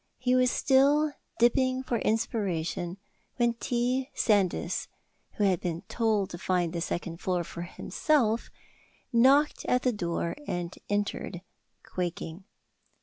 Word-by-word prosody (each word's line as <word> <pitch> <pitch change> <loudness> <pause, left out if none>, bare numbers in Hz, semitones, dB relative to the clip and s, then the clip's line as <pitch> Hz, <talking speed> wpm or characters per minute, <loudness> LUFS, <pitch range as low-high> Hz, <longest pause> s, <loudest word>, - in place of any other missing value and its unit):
He 250 +1 +1
was 255 0 +4
still 285 +4 +3 0.2
dipping 255 +2 +3
for 240 -3 -1
inspiration 185 -5 -1 0.4
when 240 -1 +2
T. 250 +3 -1
Sandys, 205 -5 +1 0.5
who 210 - -1
had 190 -4 +2
been 170 -1 -3
told 220 -4 +1
to 175 - -7
find 180 -2 0
the 170 - -2
second 170 -1 -3
floor 180 -1 -1
for 170 - -8
himself, 230 - 0 0.6
knocked 270 +5 +4
at 250 0 +2
the 250 - +2
door, 170 -4 -2
and 175 0 -3
entered, 205 -3 -2 0.4
quaking. 175 0 -4
210 Hz, 125 wpm, -28 LUFS, 175-250 Hz, 0.6 s, was